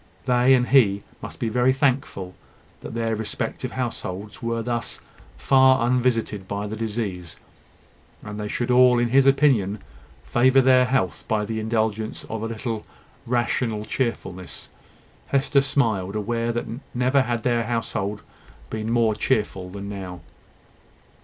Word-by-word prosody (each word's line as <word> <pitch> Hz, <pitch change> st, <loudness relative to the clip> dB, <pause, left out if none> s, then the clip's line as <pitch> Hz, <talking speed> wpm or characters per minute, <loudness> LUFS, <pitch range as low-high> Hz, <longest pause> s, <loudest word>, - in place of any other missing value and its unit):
They 125 Hz, +1 st, +5 dB
and 125 Hz, -1 st, +1 dB
he 105 Hz, -7 st, +4 dB, 0.2 s
must -, -, -8 dB
be 115 Hz, -, -1 dB
very 125 Hz, +3 st, +3 dB
thankful 130 Hz, -9 st, -1 dB, 0.5 s
that -, -, -8 dB
their 115 Hz, -1 st, 0 dB
respective 110 Hz, +3 st, -4 dB
households 105 Hz, -5 st, -5 dB
were 115 Hz, 0 st, -2 dB
thus 120 Hz, 0 st, -3 dB, 0.4 s
far 130 Hz, -2 st, +4 dB
unvisited 120 Hz, -5 st, 0 dB
by 100 Hz, +1 st, -3 dB
the 105 Hz, +1 st, -4 dB
disease; 105 Hz, -6 st, -4 dB, 0.9 s
and 105 Hz, 0 st, -7 dB
they 105 Hz, -, -3 dB
should 120 Hz, +4 st, -2 dB
all, 125 Hz, 0 st, +6 dB
in 120 Hz, 0 st, +1 dB
his 135 Hz, +2 st, +4 dB
opinion, 130 Hz, -8 st, +3 dB, 0.5 s
favour 130 Hz, +2 st, +4 dB
their 130 Hz, -1 st, +5 dB
health 125 Hz, -8 st, -1 dB
by 105 Hz, -1 st, 0 dB
the 110 Hz, +1 st, -3 dB
indulgence 110 Hz, 0 st, -1 dB
of 110 Hz, -1 st, -5 dB
a 115 Hz, -, -2 dB
little 115 Hz, -1 st, -4 dB, 0.4 s
rational 120 Hz, -2 st, 0 dB
cheerfulness. 95 Hz, -8 st, -4 dB, 0.6 s
Hester 140 Hz, 0 st, +2 dB
smiled, 110 Hz, -9 st, 0 dB
aware 115 Hz, +2 st, -1 dB
that 120 Hz, 0 st, -2 dB, 0.3 s
never 130 Hz, +3 st, +3 dB
had 120 Hz, -3 st, -2 dB
their 120 Hz, -2 st, +1 dB
household 105 Hz, -3 st, -2 dB, 0.5 s
been 110 Hz, 0 st, -3 dB
more 115 Hz, -2 st, +3 dB
cheerful 105 Hz, -5 st, -1 dB
than 100 Hz, +1 st, -7 dB
now. 95 Hz, -3 st, -7 dB
115 Hz, 140 wpm, -24 LUFS, 105-125 Hz, 0.9 s, all